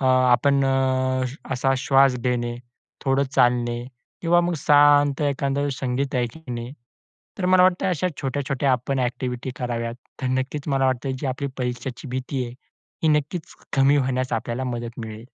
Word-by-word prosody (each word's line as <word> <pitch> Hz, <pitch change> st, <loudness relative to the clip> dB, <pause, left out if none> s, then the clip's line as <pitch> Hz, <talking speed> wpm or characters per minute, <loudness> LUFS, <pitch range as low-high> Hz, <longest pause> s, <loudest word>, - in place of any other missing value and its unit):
अ, 130 Hz, -, +1 dB
आपण 130 Hz, +2 st, +4 dB, 0.9 s
असा 135 Hz, +1 st, +1 dB
श्वास 135 Hz, -1 st, +4 dB
घेणे, 120 Hz, -1 st, -1 dB, 0.5 s
थोडं 135 Hz, +1 st, +2 dB
चालणे 120 Hz, -1 st, +2 dB, 0.4 s
किंवा 175 Hz, +1 st, +4 dB
मग 175 Hz, 0 st, 0 dB
शांत 145 Hz, -1 st, +5 dB
एखाद्या 140 Hz, 0 st, 0 dB
वेळेस 140 Hz, -2 st, -2 dB
संगीत 130 Hz, +1 st, -1 dB
ऐकणे. 120 Hz, -1 st, -4 dB, 0.7 s
तर 180 Hz, -, 0 dB
मला 185 Hz, 0 st, +5 dB
वाटतं, 185 Hz, 0 st, +3 dB
अशा 180 Hz, 0 st, 0 dB
छोट्या-छोट्या 135 Hz, 0 st, 0 dB
आपण 130 Hz, +2 st, -1 dB
ॲक्टिविटी 125 Hz, 0 st, -2 dB
कराव्यात, 115 Hz, -2 st, -3 dB, 0.3 s
तर -, -, 0 dB
नक्कीच 140 Hz, +3 st, -5 dB
मला 135 Hz, -1 st, +2 dB
वाटतं, 130 Hz, +1 st, -1 dB
जी 145 Hz, -, -3 dB
आपली 135 Hz, +2 st, -2 dB
परीक्षेची 125 Hz, +1 st, -4 dB
भीती 130 Hz, +1 st, -3 dB
आहे, 120 Hz, -, -7 dB, 0.5 s
ही 160 Hz, -, +3 dB
नक्कीच 155 Hz, +3 st, -6 dB, 0.2 s
कमी 140 Hz, +2 st, +5 dB
होण्यास 130 Hz, -2 st, 0 dB
आपल्याला 120 Hz, +3 st, -2 dB
मदत 120 Hz, -1 st, -5 dB
मिळेल. 110 Hz, +1 st, -9 dB
130 Hz, 150 wpm, -23 LUFS, 125-140 Hz, 0.9 s, शांत